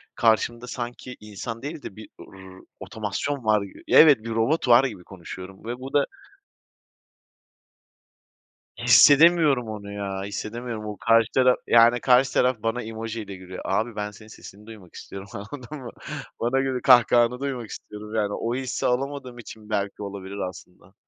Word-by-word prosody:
karşımda 120 +1 +1
sanki 125 +1 -6
insan 105 +2 -7
değil 150 +2 -6
de - - -8
bir, 110 0 -11
r 95 -1 -13 0.2
otomasyon 110 +5 -4
var 105 -1 +3 0.3
evet, 140 -8 +6
robot 115 +7 0
var 120 +1 +7
gibi 100 -8 -6
konuşuyorum 95 +1 -10
ve 120 +2 -5
bu 130 +1 -8
da 145 - +3 2.7
Hissedemiyorum 150 -4 +5
onu 105 -2 -7
ya, 100 -1 -4
hissedemiyorum. 110 +2 -5
O 105 -1 -6
karşı 115 0 +3
taraf 130 -1 +4
yani, 120 +1 +5
karşı 130 +1 +4
taraf 125 -1 +2
bana 115 +2 -1
emoji 115 0 -6
ile 100 -2 -8
gülüyor. 95 0 -9
Abi 110 +3 -1
ben 105 0 -4
senin 110 +1 -15
sesini 105 -1 -13
duymak 105 -6 -13
istiyorum 100 0 -9
anladın 125 +7 -8
mı? 125 -3 -8 0.5
Bana 120 +3 +1
göre, 135 -1 -1
kahkahanı 120 -1 +5
duymak 130 -5 -4
istiyorum 105 +1 -9
yani, 105 -2 0
o 115 +3 -2
hissi 130 -2 -3
alamadığım 130 0 -2
için 110 -2 -12
belki 100 -1 -2
olabilir 100 0 -7
aslında. 90 +1 -16
115 Hz, 150 wpm, -24 LUFS, 105-125 Hz, 2.7 s, var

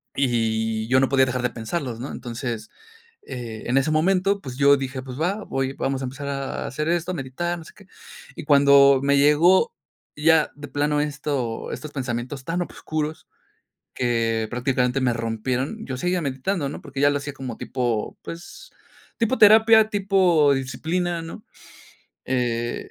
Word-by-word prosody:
Y 110 -4 0
yo 130 +1 +4
no 135 - +2
podía 135 -1 +4
dejar 125 0 -2
de 125 - +1
pensarlos, 115 +1 -4
¿no? 130 - -5
Entonces, 120 -2 -5 0.5
eh, 120 -4 -7
en 125 +3 +2
ese 135 +3 +2
momento, 190 +5 +2
pues 130 -2 -8
yo 140 0 +6
dije, 135 -1 -4
pues 130 +1 -8
va, 195 +5 -1
voy 135 0 -2
vamos 135 0 -2
a - - -2
empezar 140 +3 -6
a 140 -1 -4
hacer 150 +5 -3
esto, 175 +1 0
a - - -3
meditar, 170 +4 -3
no 165 - -10
sé - - -14
qué. 200 -2 -18 0.5
Y - - -7
cuando 140 -2 +6
me 140 0 +3
llegó 165 - +4 0.4
ya 155 +1 +4
de 145 0 -9
plano 145 +1 0
esto, 145 -5 -3
estos 155 - -6
pensamientos 130 0 -4
tan 170 +5 -2
obscuros 155 -2 -4 0.7
que 115 -2 0
prácticamente 125 +1 0
me 125 -2 +2
rompieron, 120 - -2
yo 130 - -4
seguía 180 +6 0
meditando 140 +4 -2
¿no? 140 - -7
Porque 140 -2 -7
ya 145 0 +5
lo 145 - 0
hacía 145 +1 -6
como 130 -4 -7
tipo, 120 -4 -2
pues, 170 +2 -10 0.5
tipo 230 +3 +1
terapia, 220 +1 +7
tipo 190 -7 +3
disciplina, 165 +6 -2
¿no? 165 - -9 0.8
Eh 120 -2 -2
140 Hz, 165 wpm, -23 LUFS, 125-160 Hz, 0.8 s, terapia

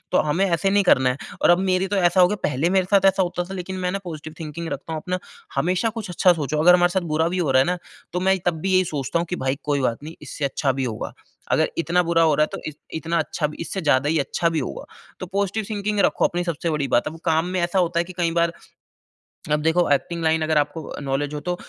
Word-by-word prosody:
तो - - +4
हमें 175 +7 +2
ऐसे 185 +2 +1
नहीं 200 0 +4
करना 130 -7 +4
है। 130 - -3 0.2
और - - +6
अब 175 - +5
मेरी 185 +1 +2
तो 205 - -1
ऐसा 180 0 +3
हो 180 - +7
गया 210 - -1
पहले 150 +6 0
मेरे 190 -1 +3
साथ 195 -1 +4
ऐसा 190 - +1
होता 175 0 -2
था 195 - -4
लेकिन 185 +1 -5
मैं 180 0 -1
ना 195 - -1
पॉज़िटिव 155 -2 -7
थिंकिंग 160 +2 -5
रखता 165 - -6
हूँ 155 - -3
अपना 185 0 -2 0.4
हमेशा 180 +10 +1
कुछ 200 -5 -6
अच्छा 180 +1 +4
सोचो। 150 -2 -2
अगर 180 +1 +7
हमारे 175 0 +4
साथ - - 0
बुरा 160 +2 +2
भी 185 +1 -2
हो 160 -6 +1
रहा 130 0 +5
है - - -2
ना 180 0 0 0.3
तो 180 - -1
मैं 190 0 +2
तब 160 -3 0
भी 190 +2 -1
यही 185 0 +4
सोचता 140 +4 -1
हूँ 170 - -1
कि 180 - -1
भई 135 +2 0
कोई 145 -2 0
बात 120 0 -1
नहीं 160 +2 -8
इससे 145 - -5
अच्छा 135 0 0
भी - - +1
होगा। 110 -3 -4 0.4
अगर - - +3
इतना 170 +2 +2
बुरा 165 -1 +2
हो 155 -2 +4
रहा 150 - +3
है - - -5
तो - - -4
इत-इतना 160 +2 -4
अच्छा 155 0 -1
भी 150 - -9
इससे 190 +3 -4
ज़्यादा 145 -3 +2
ही 160 0 +2
अच्छा 155 +4 0
भी 165 -1 -1
होगा। 70 - -5 0.4
तो 185 - -4
पॉज़िटिव 200 +3 -1
थिंकिंग 210 0 -2
रखो - - +2
अपनी 175 0 0
सबसे 170 0 -2
बड़ी 150 -2 -1
बात 120 - +2
है। - - -8
अब - - -11
काम 160 0 +2
में 180 - +1
ऐसा 175 +2 0
होता 170 -1 +1
है 170 - 0
कि 185 - -10
कई 170 -2 +1
बार 170 0 +2 1.0
अब 150 0 +2
देखो 160 +3 +2
एक्टिंग 170 +4 -2
लाइन 160 0 +2
अगर 155 -1 +1
आपको 150 +1 -2
नॉलेज 140 +2 -2
हो 150 - -3
तो - - +2
170 Hz, 275 wpm, -23 LUFS, 150-180 Hz, 1.0 s, हो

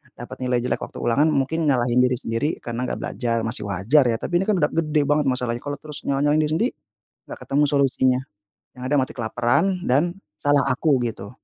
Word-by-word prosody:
dapat 120 - -9
nilai 125 -1 0
jelek 125 - -1
waktu - - -7
ulangan 140 +6 +3
mungkin 155 +2 0
nyalahin 125 -2 +2
diri 125 0 +3
sendiri 115 +4 -2
karena 120 +2 -3
nggak - - -2
belajar, 115 -2 -2
masih 110 -2 -3
wajar 110 +9 +3
ya. 115 - +1
Tapi 175 +9 -1
ini 195 - -2
kan 210 - +3
udah 150 -4 +1
gede 155 -2 +1
banget 145 0 +1
masalahnya, 125 -2 -1
kalau 145 +2 -5
terus 150 0 -8
nyalah-nyalahin 145 +2 +2
diri - - -5
sendiri 230 +8 +1 0.6
enggak - - -8
ketemu 145 +2 +2
solusinya, 130 -2 +2 0.6
yang 125 - -11
ada 145 - +3
mati 130 - -1
kelaparan 125 - 0
dan 135 +4 +3 0.3
salah 145 -1 +2
aku 135 +1 +2
gitu. 105 -2 -6
130 Hz, 200 wpm, -23 LUFS, 120-150 Hz, 0.6 s, ulangan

